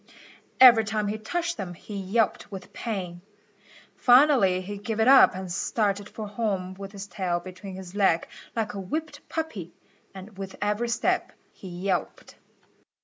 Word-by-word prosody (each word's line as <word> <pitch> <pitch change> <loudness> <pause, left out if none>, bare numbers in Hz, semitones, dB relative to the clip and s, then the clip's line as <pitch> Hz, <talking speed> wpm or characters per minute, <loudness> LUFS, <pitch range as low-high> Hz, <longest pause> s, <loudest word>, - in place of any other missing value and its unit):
Every 245 -3 +9
time 210 -1 -1
he 215 +1 -3
touched 340 +9 -2
them 180 -3 -5
he 205 +4 -10
yelped 200 +2 0
with 190 -2 -9
pain. 185 -6 -5 0.8
Finally 245 -8 +5
he 200 +2 -7
gave 220 +2 -4
it 220 - +3
up 270 -7 +7
and 185 -1 -6
started 205 +2 -1
for 215 -1 -7
home 200 -4 -2
with 195 +1 -9
his 200 -1 -7
tail 180 -4 -2
between 185 +2 -9
his 185 -1 -9
legs 190 -5 +2 0.3
like 225 +1 -2
a 200 - -5
whipped 295 - -4
puppy, 220 - -4 0.4
and 195 +1 -11
with 195 -1 -6
every 210 +3 -1
step 235 - 0 0.2
he 190 - -11
yelped. 180 +1 -3
200 Hz, 155 wpm, -26 LUFS, 185-225 Hz, 0.8 s, Every